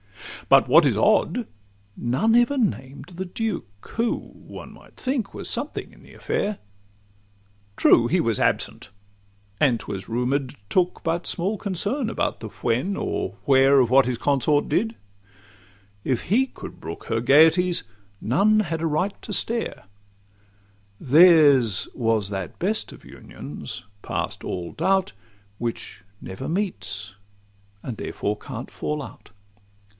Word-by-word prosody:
But - - +6
what - - +6
is - - +1
odd, 245 -3 +2 0.5
none 130 - +1
ever 240 +4 +3
named 145 - -2
the 185 - -3
duke, 175 - -5
Who, 230 +1 0 0.2
one - - -11
might - - -18
think, 255 -5 -2
was - - -5
something - - -3
in - - -19
the - - -16
affair; 205 0 -2 1.2
True, 120 - +5
he 180 +8 +2
was 115 -9 0
absent, - - -1 0.7
and, 125 -6 +3
'twas 100 -2 -7
rumour'd, 125 +3 -1
took 180 - 0
But 170 +1 -1
small 195 +5 -1
concern 210 - -2
about 230 - -2
the 110 - -6
when, 135 - -1
or 95 - -3
where, 135 0 +5
Or 130 - +6
what 130 +2 +4
his 125 -2 -1
consort 145 +2 +1
did: 225 +3 0 1.1
if 130 -4 -1
he 250 +8 +2
could - - -11
brook 80 +1 -7
Her 115 0 -1
gaieties, 160 +7 +5 0.4
none 205 - +3
had 165 -5 -3
a 165 - +1
right 180 +6 -1
to - - -8
stare: 230 +3 -1 1.2
Theirs 145 - +6
was 115 -5 0
that 95 -3 -5
best 210 +5 -1
of - - -14
unions, - - -9 0.2
past - - -4
all 85 -2 -4
doubt, 190 - +1 0.5
Which 115 -5 -5 0.2
never 115 +10 -7
meets, 135 - -3 0.7
and 120 -4 -5
therefore 105 - -3
can't 125 +2 -8
fall 150 -1 -3
out. - - -12
150 Hz, 135 wpm, -24 LUFS, 120-195 Hz, 1.2 s, But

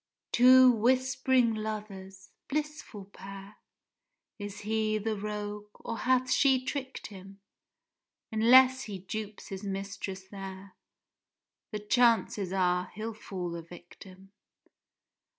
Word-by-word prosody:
Two 255 +1 +7
whisp'ring 255 +1 +2
lovers—blissful 215 +5 -6
pair! 195 +1 -10 0.8
Is 205 -1 -7
he 215 0 0
the 215 +1 -2
rogue? 210 0 -5
or 230 - -6
hath 255 0 +2
she 260 -1 +3
trick'd 265 -2 -5
him? 195 -1 -11 0.9
Unless 255 +4 +6
he 205 -3 -6
dupes 210 +3 -7
his 195 +1 -6
mistress 195 -1 -5
there, 195 -1 -9 0.9
The 210 - -4
chances 220 -4 +2
are, 180 -1 +1
he'll 220 +2 -4
fall 180 -5 -6
a 170 - -5
victim. 185 +3 -14
210 Hz, 100 wpm, -30 LUFS, 195-245 Hz, 0.9 s, Two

